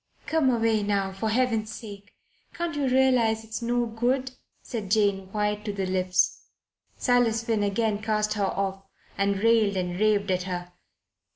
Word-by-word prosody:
"Come 315 Hz, -4 st, +2 dB
away 225 Hz, -3 st, +2 dB
now, 200 Hz, -1 st, 0 dB
for 195 Hz, +4 st, -3 dB
Heaven's 225 Hz, -2 st, +1 dB
sake. 205 Hz, -2 st, -11 dB, 0.4 s
Can't 340 Hz, -2 st, -3 dB
you 285 Hz, -2 st, 0 dB
realize 250 Hz, -4 st, +3 dB
it's 225 Hz, +2 st, -6 dB
no 240 Hz, +1 st, 0 dB
good?" 245 Hz, +3 st, -1 dB, 0.3 s
said 215 Hz, -5 st, -5 dB
Jane, 200 Hz, -2 st, +1 dB
white 210 Hz, 0 st, -1 dB
to 210 Hz, -, -1 dB
the 195 Hz, -1 st, -2 dB
lips. 185 Hz, 0 st, 0 dB, 0.5 s
Silas 240 Hz, -2 st, +2 dB
Finn 225 Hz, -2 st, 0 dB
again 205 Hz, +1 st, 0 dB
cast 215 Hz, -1 st, 0 dB
her 205 Hz, -2 st, 0 dB
off 195 Hz, 0 st, -2 dB, 0.3 s
and 200 Hz, 0 st, 0 dB
railed 225 Hz, -4 st, +3 dB
and 180 Hz, 0 st, -2 dB
raved 205 Hz, -2 st, +2 dB
at 185 Hz, 0 st, +1 dB
her. 175 Hz, 0 st, -5 dB
215 Hz, 160 wpm, -26 LUFS, 200-230 Hz, 0.5 s, realize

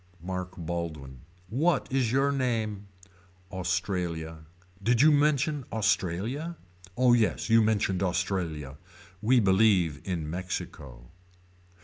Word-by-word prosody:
Mark 90 Hz, 0 st, -5 dB
Baldwin. 80 Hz, -6 st, -5 dB, 0.3 s
What 145 Hz, -, +1 dB
is 130 Hz, -4 st, +1 dB
your 135 Hz, +2 st, +2 dB
name. 110 Hz, -7 st, -2 dB, 0.6 s
Australia. 90 Hz, -4 st, -3 dB, 0.3 s
Did 115 Hz, +3 st, +3 dB
you 155 Hz, -, +7 dB
mention 145 Hz, 0 st, +2 dB
Australia. 110 Hz, -, -1 dB, 0.4 s
Oh 125 Hz, -1 st, +5 dB
yes 115 Hz, -1 st, +1 dB
you 115 Hz, 0 st, +7 dB
mentioned 105 Hz, -4 st, +1 dB
Australia. 90 Hz, -6 st, -2 dB, 0.4 s
We 125 Hz, +3 st, +4 dB
believe 95 Hz, -7 st, +3 dB
in 85 Hz, -5 st, -3 dB
Mexico. 85 Hz, -7 st, -6 dB
95 Hz, 100 wpm, -28 LUFS, 85-120 Hz, 0.6 s, you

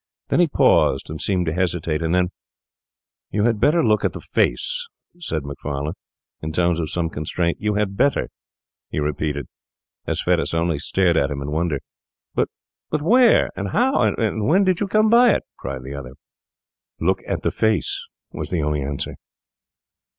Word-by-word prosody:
Then -, -, +2 dB
he 175 Hz, -, +5 dB
paused 70 Hz, -, +3 dB
and 80 Hz, -, -5 dB
seemed 90 Hz, -3 st, 0 dB
to 80 Hz, -, -1 dB
hesitate; 85 Hz, -3 st, -1 dB
and 80 Hz, +2 st, +1 dB
then, 90 Hz, -1 st, +2 dB, 1.0 s
'You 105 Hz, -, 0 dB
had 115 Hz, -2 st, +2 dB
better 150 Hz, +9 st, +4 dB
look 110 Hz, -2 st, +3 dB
at -, -, +1 dB
the -, -, -6 dB
face,' -, -, 0 dB, 0.3 s
said 80 Hz, -, -3 dB
he, 70 Hz, +1 st, -4 dB, 0.5 s
in 80 Hz, -, -4 dB
tones 85 Hz, +1 st, +1 dB
of 80 Hz, -2 st, -2 dB
some 85 Hz, -2 st, -1 dB
constraint. 85 Hz, +2 st, -2 dB
'You 105 Hz, -1 st, 0 dB
had 105 Hz, -2 st, 0 dB
better,' 140 Hz, +7 st, +2 dB, 0.6 s
he -, -, -2 dB
repeated, 75 Hz, -1 st, -2 dB, 0.6 s
as -, -, -1 dB
Fettes -, -, +1 dB
only 80 Hz, -2 st, +1 dB
stared 85 Hz, +2 st, +2 dB
at 70 Hz, -2 st, +2 dB
him 70 Hz, -1 st, -3 dB
in 70 Hz, +1 st, -4 dB
wonder. 80 Hz, -2 st, 0 dB, 0.5 s
'But -, -, +1 dB, 0.5 s
where, 240 Hz, +7 st, +5 dB
and -, -, -3 dB
how, 255 Hz, +4 st, +3 dB
and 110 Hz, -2 st, +1 dB
when 185 Hz, +7 st, +4 dB
did 185 Hz, -2 st, +2 dB
you 205 Hz, -, 0 dB
come 215 Hz, +2 st, +3 dB
by 235 Hz, -2 st, +7 dB
it?' -, -, -1 dB, 0.2 s
cried 65 Hz, 0 st, -5 dB
the 65 Hz, +2 st, -7 dB
other. 65 Hz, -3 st, -7 dB, 0.9 s
'Look -, -, +1 dB
at -, -, -2 dB
the -, -, +1 dB
face,' 110 Hz, -6 st, 0 dB, 0.3 s
was -, -, -5 dB
the 85 Hz, -4 st, 0 dB
only 75 Hz, -1 st, 0 dB
answer. 70 Hz, +1 st, -4 dB
85 Hz, 170 wpm, -22 LUFS, 75-115 Hz, 1.0 s, by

